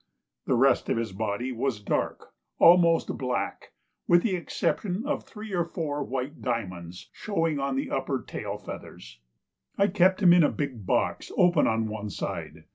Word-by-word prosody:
The 130 Hz, -, +3 dB
rest 135 Hz, +3 st, +3 dB
of -, -, +1 dB
his 115 Hz, -3 st, -2 dB
body 110 Hz, +5 st, -2 dB
was 125 Hz, -2 st, -2 dB
dark, 100 Hz, -, -3 dB, 0.2 s
almost 170 Hz, -1 st, +5 dB
black, 125 Hz, -2 st, -3 dB, 0.4 s
with 175 Hz, 0 st, +5 dB
the 200 Hz, -5 st, +1 dB
exception 185 Hz, +4 st, -2 dB
of 290 Hz, 0 st, -2 dB
three 215 Hz, -1 st, -9 dB
or 175 Hz, -2 st, +2 dB
four 155 Hz, -4 st, -3 dB
white 135 Hz, +3 st, -4 dB
diamonds 90 Hz, -8 st, -4 dB
showing 165 Hz, -8 st, -1 dB
on 135 Hz, -1 st, -1 dB
the 135 Hz, -, -2 dB
upper -, -, -2 dB
tail -, -, -5 dB
feathers. -, -, -10 dB, 0.6 s
I 200 Hz, +1 st, +3 dB
kept 185 Hz, +1 st, +3 dB
him 175 Hz, -2 st, +8 dB
in 175 Hz, -, +6 dB
a -, -, +4 dB
big 125 Hz, -9 st, -4 dB
box -, -, 0 dB
open 175 Hz, -4 st, +4 dB
on 110 Hz, 0 st, +1 dB
one 105 Hz, -1 st, -5 dB
side. -, -, -5 dB
140 Hz, 165 wpm, -27 LUFS, 115-175 Hz, 0.6 s, him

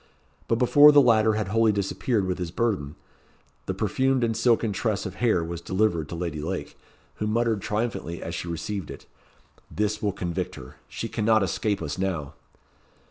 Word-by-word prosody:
But 115 Hz, -, +2 dB
before 145 Hz, +4 st, +7 dB
the 145 Hz, -, +7 dB
latter 110 Hz, -4 st, +4 dB
had 105 Hz, -3 st, -2 dB
wholly 115 Hz, +1 st, +3 dB
disappeared 100 Hz, +2 st, -1 dB
with 90 Hz, -1 st, -2 dB
his 90 Hz, -2 st, -3 dB
burthen, 90 Hz, -8 st, -1 dB, 0.7 s
the -, -, -2 dB
perfumed 130 Hz, -1 st, +1 dB
and 115 Hz, -1 st, 0 dB
silken 115 Hz, -2 st, +2 dB
tress 100 Hz, -1 st, -1 dB
of 95 Hz, -, -5 dB
hair 110 Hz, -8 st, +3 dB
was 85 Hz, 0 st, -5 dB
delivered 95 Hz, -4 st, 0 dB
to -, -, -5 dB
Lady 85 Hz, -3 st, -4 dB
Lake, 80 Hz, -3 st, -4 dB, 0.4 s
who 105 Hz, -, -2 dB
muttered 115 Hz, -1 st, +1 dB
triumphantly 105 Hz, -6 st, -3 dB
as -, -, -6 dB
she -, -, -4 dB
received 85 Hz, +2 st, -4 dB
it -, -, -9 dB, 0.6 s
"This 105 Hz, 0 st, -1 dB
will 105 Hz, -, +1 dB
convict 90 Hz, -3 st, -4 dB
her. 65 Hz, -1 st, -12 dB
She -, -, -4 dB
cannot 110 Hz, -1 st, +2 dB
escape 100 Hz, +1 st, -1 dB
us 75 Hz, +3 st, -4 dB
now." 85 Hz, -8 st, -2 dB
105 Hz, 175 wpm, -25 LUFS, 85-115 Hz, 0.7 s, before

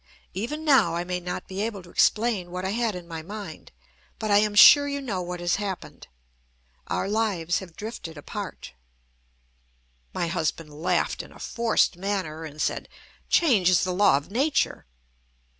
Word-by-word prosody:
Even 295 Hz, +11 st, -4 dB
now 265 Hz, -, +4 dB
I 170 Hz, -, -1 dB
may 180 Hz, 0 st, -3 dB
not 180 Hz, 0 st, -5 dB
be 190 Hz, +1 st, -4 dB
able 210 Hz, -4 st, -3 dB
to 175 Hz, -, -15 dB
explain 210 Hz, -5 st, +2 dB
what 180 Hz, +1 st, -5 dB
I 190 Hz, -, -1 dB
had 230 Hz, -2 st, 0 dB
in 175 Hz, -1 st, -8 dB
my 165 Hz, -1 st, -6 dB
mind. 195 Hz, -1 st, -9 dB, 0.5 s
But 215 Hz, -2 st, -2 dB
I 205 Hz, -, +6 dB
am 210 Hz, 0 st, 0 dB
sure 285 Hz, +7 st, +9 dB
you 280 Hz, 0 st, -2 dB
know 215 Hz, -9 st, -3 dB
what 180 Hz, 0 st, -5 dB
has 175 Hz, +1 st, +1 dB
happened. 200 Hz, -3 st, -6 dB, 0.8 s
Our -, -, -1 dB
lives 200 Hz, -6 st, 0 dB
have 180 Hz, -4 st, -11 dB
drifted 205 Hz, -7 st, -7 dB
apart." 145 Hz, -, -7 dB, 1.4 s
My -, -, -2 dB
husband 165 Hz, -2 st, -2 dB
laughed 155 Hz, +4 st, 0 dB
in -, -, -14 dB
a -, -, -14 dB
forced 230 Hz, -5 st, +1 dB
manner, 185 Hz, -5 st, -3 dB
and 150 Hz, -1 st, -10 dB
said: -, -, -2 dB, 0.4 s
"Change 225 Hz, -, +4 dB
is 180 Hz, -, +4 dB
the 185 Hz, -, -1 dB
law 195 Hz, -5 st, +4 dB
of 145 Hz, +6 st, -7 dB
nature." 275 Hz, -, 0 dB
190 Hz, 170 wpm, -25 LUFS, 175-215 Hz, 1.4 s, sure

